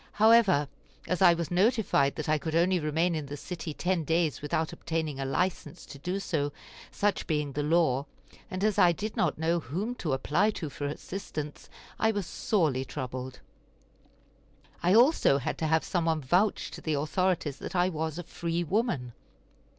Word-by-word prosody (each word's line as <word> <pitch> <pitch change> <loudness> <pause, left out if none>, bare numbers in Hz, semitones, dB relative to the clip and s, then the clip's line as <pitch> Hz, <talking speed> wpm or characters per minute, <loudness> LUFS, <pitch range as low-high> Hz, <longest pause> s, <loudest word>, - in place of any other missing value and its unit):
However, 215 -9 +5 0.4
as 180 +1 -2
I 175 -2 +7
was 170 0 -4
notified 190 - +2
that 155 - -4
I 155 0 +2
could 160 +1 -3
only 180 +2 +3
remain 160 +3 +1
in 155 -3 -3
the 145 +1 -6
city 170 0 -6
ten 175 +2 -1
days 160 0 0
without 155 +2 -1
obtaining 160 -4 -3
a 135 - -2
license 155 +1 -2
to 140 - -11
do 180 +6 -2
so, 145 -7 -1 0.4
such 205 0 -1
being 150 -3 -1
the 145 - -2
law, 150 -3 +2 0.4
and 185 +1 -4
as 215 -2 +2
I 175 -1 +6
did 210 +6 -5
not 165 - +1
know 165 +2 +1
whom 180 - -3
to 155 -6 -1
apply 165 +10 +2
to 155 -5 -5
for 145 +2 -4
assistance, 150 -1 -6 0.3
I 220 - +3
was 205 -4 -1
sorely 155 - 0
troubled. 130 -1 -6 1.4
I 180 +3 +3
also 240 - +5
had 135 - -3
to 160 - 0
have 160 +1 +2
some 175 -3 -1
one 160 -1 +1
vouch 180 +10 +1
to - - -9
the 155 -2 -1
authorities 155 0 0
that - - -7
I 180 +1 +3
was 160 -2 -3
a 175 - -4
free 170 0 -3
woman. 170 - -1
165 Hz, 180 wpm, -29 LUFS, 145-185 Hz, 1.4 s, I